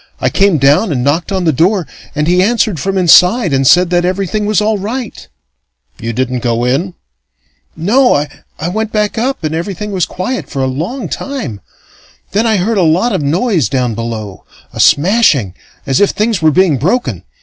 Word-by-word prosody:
I - - 0
came 195 -4 +3
down 145 - +3
and 125 -4 -1
knocked 155 +8 0
on 190 -2 -1
the 160 -2 +2
door, 180 +5 +1 0.3
and 150 0 0
he 180 +2 +2
answered 215 -4 +1
from 195 +5 -2
inside 180 - +4
and 135 -1 +2
said 180 +3 +4
that 175 0 +2
everything 195 +3 -1
was 215 -1 +2
all 215 0 0
right 230 +4 -6 0.4
" 60 -1 -44
"You 115 +1 -3
didn't 125 +2 -2
go 120 -1 -1
in?" 155 +9 -1 0.8
"No. 245 +10 +2 0.4
I 165 - -3
went 220 +3 -3
back 210 +1 -1
up, 260 -3 -2
and 155 0 -2
everything 195 +5 -4
was 185 -4 -1
quiet 250 +8 -4
for 135 -2 -3
a - - +1
long 165 - -4
time. 165 - -5 0.7
Then 215 +4 +1
I 220 -2 +2
heard 205 +3 0
a - - +3
lot 180 +8 +2
of 190 - -1
noise 165 - 0
down 125 -3 -1
below 110 -3 -6 0.3
a - - -8
smashing 150 - +3 0.3
as 135 +4 +1
if 205 - +4
things 215 -4 -1
were 160 - +4
being 165 -2 +2
broken. 190 - -1
180 Hz, 190 wpm, -13 LUFS, 140-210 Hz, 0.8 s, inside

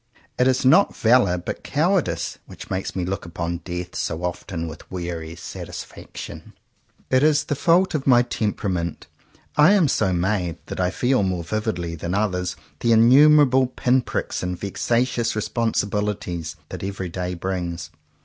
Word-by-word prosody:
It 125 - +4
is 130 0 +1
not 190 +10 +5
valour 115 -6 +4
but 90 - -6
coward 170 - +1
ice 85 -1 -4
that - - -11
makes 95 0 -3
me 90 -2 -1
look 95 +1 -3
upon 85 0 -4
death 90 0 -6
so 80 +2 -3
often 85 -1 -4
with 80 -1 -10
weary 85 -3 -5
satisfaction. 85 - -8
90 - - -14
JOHN - - -18
COWPER - - -41
POWYS 130 0 0
It - - +2
is 150 -1 +3
the 145 - -2
fault 175 +6 +3
of 145 -3 -2
my 120 -2 +7
temperament. 100 -7 -2 0.5
I 150 +7 +7
am 190 -7 +4
so 95 -7 +1
made 90 -1 0
that - - -6
I 90 -1 +2
feel 125 +5 +1
more 95 -3 -1
vividly 90 -3 -2
than 85 +3 -3
others 90 -4 -1 0.2
the 120 - +1
innumerable 130 +3 +6
pin 125 0 +1
pricks - - -3
and 90 -1 -3
vexa 115 +4 +1
tious 120 -3 -2
responsibilities 105 -5 -2
that - - -7
every 95 -2 -4
day 90 +1 -3
brings. 85 -3 -4
100 Hz, 170 wpm, -23 LUFS, 90-125 Hz, 0.5 s, my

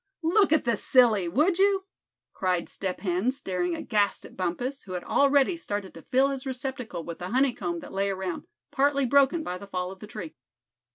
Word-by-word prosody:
"Look 375 +2 +4
at 315 - +4
the 235 -3 +2
silly, 225 -8 +4
would 310 - +2
you?" 390 -1 +3 0.5
cried 180 -2 -1
Step 190 -2 -4
Hen, 185 +4 0
staring 180 -9 -2
aghast 205 0 0
at - - -13
Bumpus, 215 +10 -3
who 185 - -7
had 180 - -4
already 280 +3 +3
started 205 - -4
to 165 - -11
fill 265 - +2
his 270 -1 -4
receptacle 260 -7 -4
with 170 0 -7
the 180 0 -5
honey 260 +2 +2
comb 170 -5 -4
that - - -10
lay 195 +1 0
around, 190 -3 -4 0.2
partly 280 0 +2
broken 280 +5 +3
by 180 -7 -4
the 200 - -10
fall 180 -1 -3
of 190 - -11
the 210 - -9
tree. 190 -8 -7
220 Hz, 195 wpm, -27 LUFS, 185-275 Hz, 0.5 s, Look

